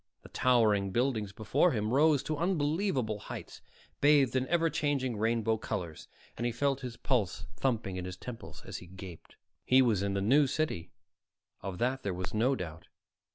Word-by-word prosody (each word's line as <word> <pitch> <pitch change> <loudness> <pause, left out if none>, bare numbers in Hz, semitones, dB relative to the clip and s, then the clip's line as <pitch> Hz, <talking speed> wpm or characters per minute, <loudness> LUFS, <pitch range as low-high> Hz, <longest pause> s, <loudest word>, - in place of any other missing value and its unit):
The - - -12
towering 110 -6 +3
buildings 115 -2 0
before 135 - +2
him 110 0 -1
rose 150 +1 +4
to 155 - -2
unbelievable 150 - 0
heights, - - -8 0.4
bathed 140 -3 +4
in 130 0 +1
ever 170 -1 +2
changing 145 -5 0
rainbow 110 +1 +1
colors, 90 -7 -5 0.3
and - - -4
he 120 - +1
felt 135 +2 0
his 125 -3 -6
pulse 120 - -1
thumping 110 -8 -1
in 90 - -4
his 90 0 -6
temples 120 +3 -9
as - - -6
he 90 - -11
gaped. 90 -2 -11 0.3
He 130 +1 +5
was 110 -6 +2
in 100 0 -1
the - - +1
New 135 +8 +4
City, 135 - -2 0.7
of 95 -2 -5
that 130 +5 0
there 100 -3 -2
was 95 +1 -5
no 120 +5 +2
doubt. 85 -5 -7
120 Hz, 175 wpm, -31 LUFS, 100-140 Hz, 0.7 s, He